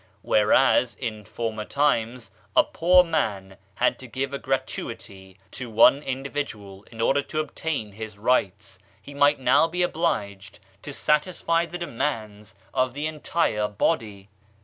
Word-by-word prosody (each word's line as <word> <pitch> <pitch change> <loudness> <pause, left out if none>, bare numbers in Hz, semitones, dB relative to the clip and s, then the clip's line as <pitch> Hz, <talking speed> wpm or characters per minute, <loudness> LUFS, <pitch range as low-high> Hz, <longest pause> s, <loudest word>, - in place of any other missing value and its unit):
Whereas, 120 +3 +3
in 110 -4 -5
former 110 -1 -4
times, 125 -3 0 0.2
a - - +7
poor 180 +2 +4
man 100 - -2 0.2
had - - +1
to 130 - -10
give 135 +3 -3
a 140 - -3
gratuity 95 -7 -5
to 125 -2 -6
one 125 +5 +5
individual 130 -8 -5
in 115 - -12
order 135 +5 +2
to 155 - -4
obtain 150 -7 -3
his 110 0 -8
rights, 100 -4 0 0.2
he 145 - -12
might 145 0 +3
now 130 +5 +4
be 180 +2 -1
obliged 100 - -2 0.2
to 145 - -8
satisfy 165 +3 +1
the 175 +2 -6
demands 110 - -4 0.2
of 130 0 0
the 145 +2 -3
entire 155 -8 0
body. 105 -2 -2
125 Hz, 140 wpm, -25 LUFS, 105-150 Hz, 0.2 s, a